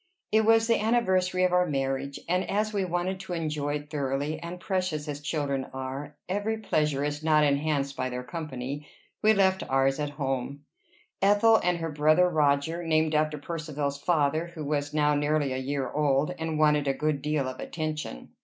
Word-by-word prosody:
It 220 Hz, 0 st, +4 dB
was 225 Hz, 0 st, +5 dB
the 230 Hz, 0 st, +2 dB
anniversary 185 Hz, -5 st, +2 dB
of 180 Hz, -1 st, +2 dB
our 180 Hz, 0 st, +3 dB
marriage; 135 Hz, 0 st, -2 dB
and 180 Hz, +2 st, 0 dB
as 215 Hz, +2 st, 0 dB
we 200 Hz, -2 st, 0 dB
wanted 180 Hz, +2 st, -2 dB
to 185 Hz, -2 st, -6 dB
enjoy 150 Hz, -3 st, -2 dB
it 145 Hz, 0 st, -7 dB
thoroughly, 145 Hz, +1 st, -2 dB
and, 170 Hz, +2 st, -7 dB
precious 180 Hz, -6 st, -2 dB
as 145 Hz, -1 st, -4 dB
children 145 Hz, -3 st, -2 dB
are, 135 Hz, +3 st, -5 dB
every 205 Hz, +4 st, -1 dB
pleasure 150 Hz, -9 st, 0 dB
is 145 Hz, +1 st, -3 dB
not 155 Hz, -1 st, +4 dB
enhanced 140 Hz, -1 st, +1 dB
by 130 Hz, -1 st, -2 dB
their 125 Hz, 0 st, -4 dB
company, 145 Hz, -1 st, -5 dB, 0.3 s
we 215 Hz, 0 st, +5 dB
left 190 Hz, -1 st, +3 dB
ours 135 Hz, +1 st, +2 dB
at 145 Hz, -1 st, -1 dB
home, 140 Hz, 0 st, -3 dB, 0.6 s
Ethel 205 Hz, +3 st, +5 dB
and 180 Hz, 0 st, +2 dB
her 165 Hz, -1 st, -3 dB
brother 155 Hz, +4 st, +4 dB
Roger 155 Hz, 0 st, +1 dB
(named 160 Hz, -1 st, +2 dB
after 155 Hz, 0 st, +1 dB
Percivale's 150 Hz, -2 st, -4 dB
father), 155 Hz, 0 st, +1 dB
who 155 Hz, -2 st, -5 dB
was 145 Hz, 0 st, -1 dB
now 150 Hz, -1 st, +2 dB
nearly 145 Hz, -1 st, +1 dB
a -, -, -2 dB
year 130 Hz, -1 st, -2 dB
old, 145 Hz, +2 st, +1 dB
and 160 Hz, -1 st, -2 dB
wanted 150 Hz, -2 st, +3 dB
a 135 Hz, -, +1 dB
good 150 Hz, 0 st, -1 dB
deal 150 Hz, -2 st, 0 dB
of 130 Hz, 0 st, -6 dB
attention. 155 Hz, -, -5 dB
150 Hz, 180 wpm, -27 LUFS, 140-175 Hz, 0.6 s, was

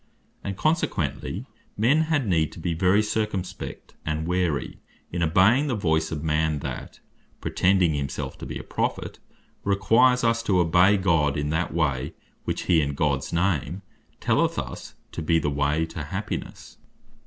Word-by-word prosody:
And 100 Hz, -1 st, -4 dB
consequently 105 Hz, -, -1 dB, 0.3 s
men 130 Hz, +9 st, +4 dB
had 155 Hz, -5 st, +1 dB
need 80 Hz, -4 st, +2 dB
to -, -, -10 dB
be 85 Hz, +1 st, -1 dB
very 95 Hz, +5 st, +3 dB
circumspect, 100 Hz, -4 st, -4 dB
and 80 Hz, 0 st, -2 dB
wary, 90 Hz, -5 st, -1 dB, 0.3 s
in 85 Hz, -, -2 dB
obeying 95 Hz, -, +4 dB
the 125 Hz, -, 0 dB
voice 80 Hz, -5 st, 0 dB
of 75 Hz, -2 st, -4 dB
man, 80 Hz, -1 st, +1 dB
that -, -, -6 dB, 0.4 s
pretending 90 Hz, -3 st, +2 dB
himself 70 Hz, -2 st, -3 dB
to -, -, -7 dB
be -, -, -5 dB
a -, -, -7 dB
Prophet, -, -, -3 dB, 0.4 s
requires 115 Hz, +6 st, +4 dB
us 115 Hz, 0 st, +2 dB
to 100 Hz, -5 st, +2 dB
obey 90 Hz, +4 st, +5 dB
God 80 Hz, -7 st, +2 dB
in 75 Hz, +1 st, -1 dB
that 80 Hz, +1 st, 0 dB
way, 75 Hz, -2 st, -1 dB, 0.3 s
which -, -, -2 dB
he 85 Hz, -2 st, +3 dB
in 70 Hz, -1 st, -2 dB
Gods 70 Hz, -3 st, 0 dB
name 85 Hz, +1 st, 0 dB, 0.4 s
telleth -, -, +1 dB
us -, -, -6 dB, 0.2 s
to -, -, -5 dB
be 80 Hz, +1 st, +2 dB
the 75 Hz, -2 st, 0 dB
way 75 Hz, +3 st, +1 dB
to 80 Hz, -2 st, -6 dB
happinesse. 95 Hz, +6 st, -6 dB
85 Hz, 155 wpm, -25 LUFS, 75-100 Hz, 0.4 s, obey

